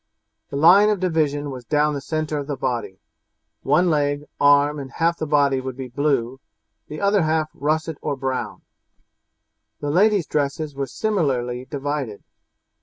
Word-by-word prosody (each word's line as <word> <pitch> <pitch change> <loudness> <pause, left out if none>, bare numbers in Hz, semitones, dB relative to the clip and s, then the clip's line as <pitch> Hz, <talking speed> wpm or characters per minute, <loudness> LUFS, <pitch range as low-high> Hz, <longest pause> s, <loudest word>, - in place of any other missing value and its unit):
The - - -6
line 180 +8 +6
of 210 -2 +1
division 150 -5 0
was 130 -2 -8
down 150 +4 +1
the 140 - -4
centre 155 0 -2
of 140 - -6
the 145 -2 -3
body; 120 -7 -3 0.6
one 165 +6 +3
leg, 145 -1 0 0.2
arm, 145 +1 +4
and 135 -1 -7
half 170 +1 0
the 155 - -2
body 140 -3 +2
would 130 -1 -6
be 130 -1 -6
blue, 135 -2 -1 0.5
the 150 - -7
other 200 0 +3
half 155 -1 0
russet 155 +1 -2
or 145 - -2
brown. 130 -1 -4 1.2
The 145 -1 -2
ladies' 200 +1 +3
dresses 150 +1 -2
were 135 0 -3
similarly 130 - -1
divided. 140 -6 -4
145 Hz, 155 wpm, -22 LUFS, 135-155 Hz, 1.2 s, line